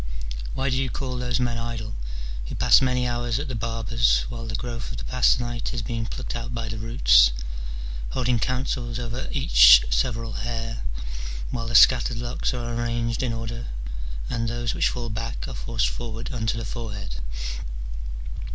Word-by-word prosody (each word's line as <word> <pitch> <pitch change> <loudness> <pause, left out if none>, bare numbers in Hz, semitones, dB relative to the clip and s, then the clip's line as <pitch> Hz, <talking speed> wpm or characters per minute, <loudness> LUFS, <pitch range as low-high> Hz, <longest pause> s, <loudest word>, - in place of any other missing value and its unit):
Why, 135 +1 0
do 130 - +2
you 130 - -1
call 125 0 -3
those 125 0 0
men 120 -2 0
idle, 115 -2 -4 0.5
who - - -5
pass - - +6
many 125 -1 +2
hours 120 -1 0
at 145 - -3
the - - -3
barber's 115 0 +2
while 115 -2 -5
the 115 - -3
growth 115 -1 -4
of - - -5
the - - -6
past 125 -1 +3
night 120 +1 -3
is 115 - -2
being 115 -1 -2
plucked 130 0 -5
out 120 +1 -4
by 115 -1 -3
the 110 0 -4
roots, - - +6 0.8
holding 125 -2 +1
councils 125 -1 -1
over 120 +1 -3
each - - +8
several 110 - 0
hair, 115 +2 -3 0.7
while 115 -1 -3
the 120 - -1
scattered 125 0 +7
locks 120 +1 -1
are 120 -2 -3
arranged 115 0 -1
in 125 -3 0
order 115 +1 -4 0.6
and 115 - -1
those 120 0 -1
which - - +2
fall 120 -2 -4
back 115 +2 -4
are - - -5
forced 115 -2 0
forward 115 -1 -5
on 110 -2 -2
to 115 - +1
the 115 - -3
forehead 105 - -5
115 Hz, 175 wpm, -25 LUFS, 115-120 Hz, 0.8 s, each